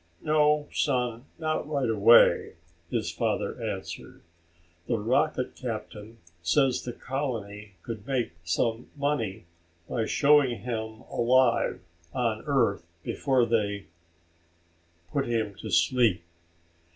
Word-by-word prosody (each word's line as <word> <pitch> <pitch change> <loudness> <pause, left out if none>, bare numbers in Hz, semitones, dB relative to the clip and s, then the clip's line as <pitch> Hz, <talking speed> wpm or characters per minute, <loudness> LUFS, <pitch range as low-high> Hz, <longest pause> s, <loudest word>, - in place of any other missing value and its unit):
"No, 150 -1 +3
son, 125 -3 0
not 155 -2 -2
right 140 -4 0
away," 115 +1 +5 0.4
his - - -1
father - - -2
answered. - - -6 0.6
"The 120 - +1
rocket 125 +5 0
captain 110 -2 -6 0.2
says 135 - +2
the 125 - -5
colony 110 -7 -5
could 110 -3 -7
make 130 -8 0
some 115 +7 -1
money 115 -9 -1 0.4
by 115 -2 -1
showing 140 -4 +4
him 110 -2 -4
alive 125 0 +2 0.3
on 115 -3 0
Earth 120 -10 +2 0.2
before 130 -4 +1
they 100 -4 0 1.3
put 140 -3 0
him 110 -3 -1
to - - -6
sleep." 115 -9 +3
120 Hz, 105 wpm, -27 LUFS, 110-135 Hz, 1.3 s, away